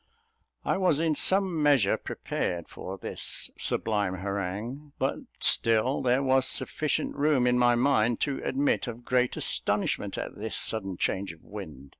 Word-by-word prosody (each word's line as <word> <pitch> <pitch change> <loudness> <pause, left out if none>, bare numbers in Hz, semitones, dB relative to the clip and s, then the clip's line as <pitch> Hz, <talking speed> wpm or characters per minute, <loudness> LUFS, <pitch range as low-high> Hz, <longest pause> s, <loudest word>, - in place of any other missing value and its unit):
I - - +1
was 180 -6 +2
in 160 -1 +2
some 185 0 +2
measure 140 -9 +4
prepared 85 -2 -4
for 95 +1 -7
this - - -2
sublime 105 -4 -1
harangue; 100 +9 -4
but - - 0 0.2
still 115 +4 +3
there 125 +2 +2
was 130 -1 +3
sufficient 155 0 -1
room 145 -3 +2
in 125 0 +3
my 120 -1 +4
mind 120 -3 +2
to 140 -2 -1
admit 140 0 0
of 120 0 -7
great 125 -1 +1
astonishment - - 0
at - - -4
this 110 +1 -1
sudden 95 -5 0
change 95 -1 -1
of 80 - -20
wind. 80 -10 -9
120 Hz, 150 wpm, -28 LUFS, 100-140 Hz, 0.2 s, measure